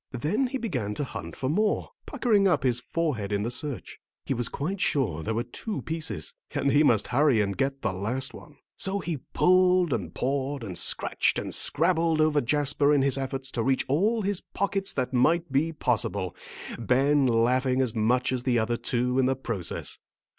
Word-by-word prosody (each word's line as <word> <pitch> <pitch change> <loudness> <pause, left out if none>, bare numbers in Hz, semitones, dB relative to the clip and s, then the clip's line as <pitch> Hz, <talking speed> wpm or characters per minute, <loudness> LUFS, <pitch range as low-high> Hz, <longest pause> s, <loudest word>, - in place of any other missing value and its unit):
Then 190 - 0
he 265 - -3
began 125 - -3
to 145 - -2
hunt 85 -10 -7
for 130 - -3
more, 210 +9 0 0.2
puckering 210 -5 +2
up 170 -7 +2
his 125 -2 +2
forehead 130 -13 -2
in 100 0 0
the 115 - -2
search. 140 0 -4 0.3
He - - 0
was 120 -2 -1
quite 185 +7 -3
sure 110 - 0
there 110 +7 -2
were 115 - 0
two 200 - -5
pieces, 160 - -3 0.2
and 140 -1 +1
he 145 - +5
must 120 -9 +3
hurry 135 -2 +3
and 100 -1 0
get 135 0 -2
the 110 -4 0
last 120 +8 -1
one. 150 - -13 0.2
So 195 +1 0
he 170 -4 -3
pulled 180 +3 +3
and - - -3
pawed 135 0 -2
and 95 -5 -6
scratched - - 0
and - - -4
scrabbled 165 0 +2
over 155 -1 +3
Jasper 145 +2 +2
in 135 - +3
his 140 0 +2
efforts 135 0 -4
to 120 - -2
reach 130 +2 +1
all 210 - +1
his 200 -1 -1
pockets 200 0 -1
that 130 -1 -2
might 160 +6 +2
be 150 +5 +1
possible, 100 - -1 0.4
Ben 135 +4 +3
laughing 125 +3 +2
as 130 -4 +1
much 120 +3 +1
as 130 -1 -1
the 125 -1 +1
other 115 +1 0
two 125 +2 0
in 130 - +3
the 135 - +1
process. 115 -9 -3
135 Hz, 190 wpm, -27 LUFS, 120-160 Hz, 0.4 s, he